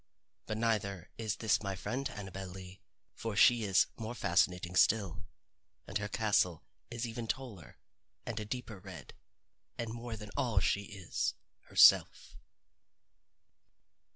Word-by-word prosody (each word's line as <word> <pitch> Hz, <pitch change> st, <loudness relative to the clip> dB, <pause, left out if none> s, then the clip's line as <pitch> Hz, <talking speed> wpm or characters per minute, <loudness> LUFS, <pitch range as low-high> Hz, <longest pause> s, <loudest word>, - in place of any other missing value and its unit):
But 110 Hz, -, -2 dB
neither 100 Hz, -5 st, -1 dB
is 110 Hz, -3 st, -1 dB
this 110 Hz, -2 st, +1 dB
my 100 Hz, -2 st, -3 dB
friend 130 Hz, +9 st, -3 dB
Annabel 95 Hz, -2 st, -7 dB
Lee. 95 Hz, +1 st, -10 dB, 0.3 s
For 115 Hz, -2 st, -5 dB
she 120 Hz, +2 st, +6 dB
is 95 Hz, -2 st, +4 dB
more 115 Hz, +1 st, -5 dB
fascinating 90 Hz, -2 st, +1 dB
still, 95 Hz, -2 st, +2 dB, 0.6 s
and -, -, -2 dB
her 105 Hz, -, -3 dB
castle 100 Hz, -5 st, +1 dB, 0.3 s
is 120 Hz, 0 st, -3 dB
even 115 Hz, 0 st, -5 dB
taller, 110 Hz, -, -5 dB, 0.5 s
and 115 Hz, -1 st, -3 dB
a 105 Hz, -, -4 dB
deeper 110 Hz, -2 st, -5 dB
red 90 Hz, -7 st, -10 dB, 0.6 s
and 115 Hz, -1 st, -3 dB
more 115 Hz, -1 st, -6 dB
than 105 Hz, -1 st, -9 dB
all 115 Hz, -6 st, +2 dB
she 100 Hz, +3 st, 0 dB
is 100 Hz, -5 st, -3 dB, 0.3 s
herself. -, -, +5 dB
105 Hz, 130 wpm, -33 LUFS, 95-115 Hz, 0.6 s, she